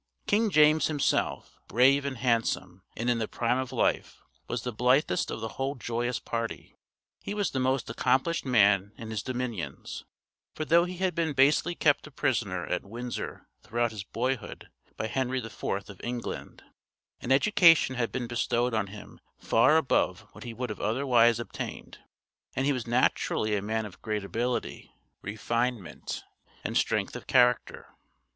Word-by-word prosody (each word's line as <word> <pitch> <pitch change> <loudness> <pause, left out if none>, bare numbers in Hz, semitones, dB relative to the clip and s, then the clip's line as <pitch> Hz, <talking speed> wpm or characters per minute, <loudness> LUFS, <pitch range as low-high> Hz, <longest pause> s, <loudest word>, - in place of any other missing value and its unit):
King 215 +2 +2
James 155 -2 +5
himself, 150 -3 -1
brave 135 +4 +4
and 140 -2 -3
handsome, 115 -6 0 0.2
and 115 - -2
in 120 -1 +2
the 110 - -1
prime 120 +2 0
of 130 -1 -4
life, - - -1 0.2
was 120 -1 -3
the 125 - -3
blithest 125 +6 +2
of 110 - -5
the 115 - -2
whole 135 +2 -1
joyous 120 0 -2
party. 115 -1 -5 0.5
He 205 - -5
was 205 -2 0
the 130 - -1
most 130 -1 0
accomplished 130 +8 +1
man 100 -5 +3
in 110 -1 -7
his 110 -3 -2
dominions; 120 - -5 0.5
for 155 - -3
though 170 +2 +5
he 180 0 -6
had 185 0 0
been 165 -3 0
basely 150 +6 +3
kept 145 -2 +2
a - - -10
prisoner 115 - -1
at 90 - -2
Windsor 120 +4 -6
throughout 120 0 -1
his 105 -3 -6
boyhood 125 +4 -3 0.3
by - - -2
Henry 130 +3 -1
IV 115 -4 -7
of 100 -1 -3
England, 120 0 -5 0.6
an 125 - -4
education 165 -1 +5
had 120 -2 -1
been 125 -1 -3
bestowed 120 +1 0
on 110 -3 0
him 100 +1 -11 0.2
far 115 +8 +4
above 160 -5 +1
what - - -12
he 120 - -6
would 125 -1 -3
have 105 - -7
otherwise 120 -1 +3
obtained; 115 -5 -7 0.6
and 135 - 0
he 145 - +3
was 125 -3 -4
naturally 115 -3 +1
a 100 - -1
man 110 +2 -2
of 95 -3 -11
great 105 -2 -2
ability, 120 +5 -3 0.3
refinement, 110 - -3 0.4
and - - -3
strength - - +1
of - - -8
character. 125 -1 +2
120 Hz, 165 wpm, -28 LUFS, 110-135 Hz, 0.6 s, James